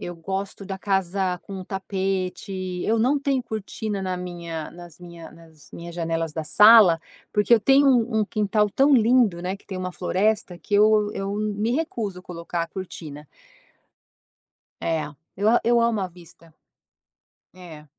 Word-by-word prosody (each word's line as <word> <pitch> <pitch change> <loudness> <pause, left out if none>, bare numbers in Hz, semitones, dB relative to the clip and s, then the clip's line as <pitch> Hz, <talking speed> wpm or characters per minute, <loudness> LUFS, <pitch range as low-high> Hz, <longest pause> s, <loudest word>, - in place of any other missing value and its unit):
Eu 175 - -6
gosto 195 +4 -5
da 190 0 -6
casa 190 -2 -1
com 190 -2 -8
tapete, 190 0 -3 0.3
eu 225 +1 +1
não 270 +5 +2
tenho 275 -2 0
cortina 215 -1 -5
na 185 -1 -3
minha 170 -3 -6
nas 175 -1 -13
minha 170 -2 -11
nas 160 -3 -18
minhas 170 0 -8
janelas 165 -2 -2
da 160 0 -4
sala, 210 -1 +7 0.3
porque 210 +3 +2
eu 230 - +8
tenho 270 +5 +4
um 235 -3 +2
um - - +2
quintal 210 0 0
tão 275 +5 +4
lindo, 230 -7 +3
né, 185 +2 -3
que - - -26
tem 190 - -6
uma 185 0 -4
floresta 195 0 -1
que 160 - -14
eu 210 0 +4
eu 195 +1 -4
me 215 +2 -1
recuso 225 - -3
a - - -22
colocar 170 -1 -5
a 165 - -5
cortina. 155 -6 -8 1.5
É, 160 -2 -1 0.3
eu 205 +2 +1
a 240 - +4
eu 235 0 +3
amo 230 -2 +1
a 190 - -1
vista. 170 -2 -17 1.0
É, 165 -4 -12
190 Hz, 165 wpm, -24 LUFS, 170-215 Hz, 1.5 s, eu